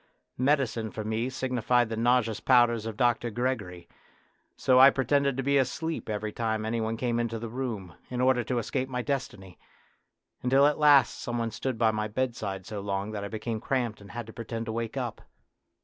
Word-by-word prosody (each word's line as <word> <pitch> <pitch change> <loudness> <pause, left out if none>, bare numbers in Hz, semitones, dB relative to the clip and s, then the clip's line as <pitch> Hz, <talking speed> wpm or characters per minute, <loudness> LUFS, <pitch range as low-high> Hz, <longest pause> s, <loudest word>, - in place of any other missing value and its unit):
Medicine 130 -5 +1
for 110 - -6
me 110 +3 -1
signified 125 -2 +1
the 115 - -3
nauseous 115 -1 +2
powders 120 -3 +3
of 110 -2 -6
Dr. 120 -1 +2
Gregory, 105 -8 -3 0.7
so 130 -1 +4
I 135 +1 +10
pretended 140 0 +1
to 135 - -1
be 140 +1 +3
asleep 155 +3 -2
every 105 0 -2
time 110 -1 -2
any 115 +1 -1
one 110 +1 -2
came 120 0 0
into 115 -1 -1
the 115 +1 -5
room, 110 -8 -4 0.2
in 125 - -4
order 125 -1 +3
to 125 +2 -1
escape 125 +3 -2
my 125 -1 -2
destiny, 115 - -4 0.8
until 135 +3 +4
at 150 +1 +2
last 145 -2 +5
some 120 0 -3
one 115 -1 -1
stood 115 +3 -3
by 110 -1 +3
my 105 0 -2
bedside 105 -5 -3
so 105 - -5
long 100 +1 -3
that 105 -2 -4
I - - -3
became 110 +1 -4
cramped 120 -6 -1
and 100 - -13
had 120 -1 -6
to 110 - -11
pretend 115 -1 -5
to 110 - -4
wake 115 +2 -4
up. 120 -4 -4
120 Hz, 195 wpm, -28 LUFS, 110-130 Hz, 0.8 s, I